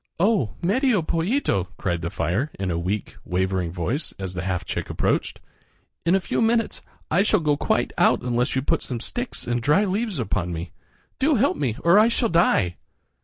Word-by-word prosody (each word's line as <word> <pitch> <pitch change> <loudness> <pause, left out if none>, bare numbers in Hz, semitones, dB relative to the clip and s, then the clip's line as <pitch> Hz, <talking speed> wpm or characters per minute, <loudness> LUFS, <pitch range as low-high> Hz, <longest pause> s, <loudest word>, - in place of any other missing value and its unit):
"Oh! 180 - +2
Medio 220 - +2
Pollito," 165 - 0
cried 85 -3 -1
the 85 - -2
fire 95 - -1
in 95 -2 -1
a 85 - -1
weak, 95 +4 -3
wavering 95 -1 -1
voice 95 - -3
as 95 -2 -4
the 90 - -3
half 90 -1 -2
chick - - -4
approached, - - -1 0.7
"in 175 - +5
a - - +4
few 185 - -2
minutes 225 0 +1 0.3
I 180 - +4
shall 210 0 +3
go 150 -3 +2
quite - - 0
out - - +4
unless 125 +1 0
you 130 - 0
put - - +1
some 125 -3 -5
sticks 245 - -4
and 120 0 -1
dry 150 - +3
leaves 205 0 -1
upon 100 -7 -1
me. 85 +1 -5 0.5
Do 285 +3 +3
help 265 +5 +2
me 130 -7 -1
or 170 +5 +6
I 220 - +6
shall 235 0 +1
die!" 110 - +2
135 Hz, 190 wpm, -24 LUFS, -, 0.7 s, or